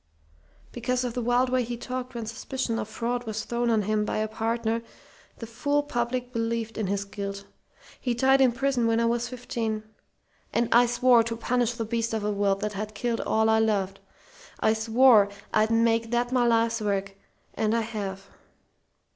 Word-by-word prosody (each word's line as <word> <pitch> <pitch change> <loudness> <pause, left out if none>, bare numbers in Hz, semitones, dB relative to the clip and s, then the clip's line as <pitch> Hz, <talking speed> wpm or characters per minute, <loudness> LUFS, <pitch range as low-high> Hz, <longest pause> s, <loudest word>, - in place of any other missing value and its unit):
"Because 250 +1 -1
of 245 -2 -3
the 245 - -2
wild 245 +2 +2
way 255 0 +2
he 240 0 -5
talked 255 +1 -5
when 230 -1 -4
suspicion 230 +1 -3
of 210 - -3
fraud 240 +2 -3
was 220 0 -3
thrown 240 0 -1
on 220 -2 +2
him 210 +1 0
by - - -2
a 215 0 0
partner 225 +1 -1 0.6
the 230 - -7
fool 285 +6 0
public 245 -1 -2
believed 230 -1 -2
in 210 - -1
his 200 +1 -1
guilt. 200 0 -6 0.5
He 245 -2 -1
died 265 +2 +4
in 260 -2 +5
prison 245 -1 +1
when 225 0 +2
I 235 - +2
was 235 +1 0
fifteen, 230 -3 -3 0.7
and 235 0 +2
I 240 +1 +6
swore 240 0 +5
to 230 0 -3
punish 245 0 0
the 230 -1 -4
beast 230 0 -1
of 220 - -2
a 210 - 0
world 200 -1 0
that 210 0 -2
had 210 +1 -5
killed 235 0 -1
all 220 0 +1
I 220 0 +4
loved. 205 -4 0 0.6
I 220 - +3
swore 225 -1 +5 0.2
I'd 215 0 +3
make 230 0 +2
that 240 +1 0
my 250 -2 +3
life's 230 0 +2
work, 200 -1 -1 0.4
and 220 +1 0
I - - +1
have. 200 -4 -5
230 Hz, 190 wpm, -26 LUFS, 215-245 Hz, 0.7 s, I